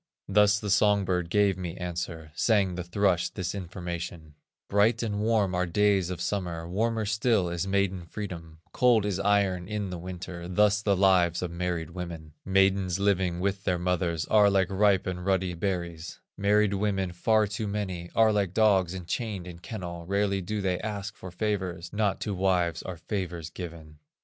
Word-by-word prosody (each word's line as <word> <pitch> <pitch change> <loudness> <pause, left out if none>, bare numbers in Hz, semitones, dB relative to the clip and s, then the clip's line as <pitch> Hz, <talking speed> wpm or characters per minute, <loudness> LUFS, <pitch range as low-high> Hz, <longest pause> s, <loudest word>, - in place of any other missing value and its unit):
"Thus 105 +1 +4
the 105 -1 -3
song 100 0 +4
bird 90 -2 -1
gave 100 -1 +2
me 90 0 -5
answer, 85 -3 -5
Sang 100 0 +2
the 90 0 -4
thrush 90 -1 +1
this 95 -3 -4
information: 85 -4 -6 0.3
'Bright 110 +4 +3
and 105 -3 -2
warm 105 -3 +2
are 90 +1 0
days 100 0 +2
of 90 - -4
summer, 85 -5 -3
Warmer 110 +4 0
still 110 -3 +1
is 85 +2 -2
maiden 95 -3 0
freedom; 85 -5 -7
Cold 120 -4 +3
is 100 -2 -1
iron 100 -3 +1
in 105 -2 -3
the 90 - -5
winter, 90 -1 -7
Thus 105 +3 +3
the 100 -2 +2
lives 90 -2 +3
of 90 - -3
married 85 -1 -3
women; 85 -3 -7
Maidens 95 -1 +2
living 95 -3 +1
with 100 +1 -1
their 90 -3 +1
mothers 85 -3 -1
Are 105 -1 +5
like 95 -1 +2
ripe 100 -1 +3
and 90 -1 -4
ruddy 95 -1 +1
berries; 85 -2 -4 0.2
Married 105 0 +3
women, 95 -2 0
far 110 +4 +3
too 105 +1 -4
many, 95 -4 -4
Are 110 -1 +5
like 100 -3 0
dogs 95 -5 +3
enchained 95 +2 -4
in 90 -2 -9
kennel, 85 -3 -7
Rarely 100 0 +1
do 105 +3 -3
they 90 -2 0
ask 105 -1 -5
for 95 - -9
favors, 90 -2 -3
Not 105 -2 0
to 105 - -2
wives 90 -3 +1
are 90 -2 -6
favors 85 -3 -4
given. 80 -4 -9
95 Hz, 175 wpm, -28 LUFS, 85-100 Hz, 0.3 s, Are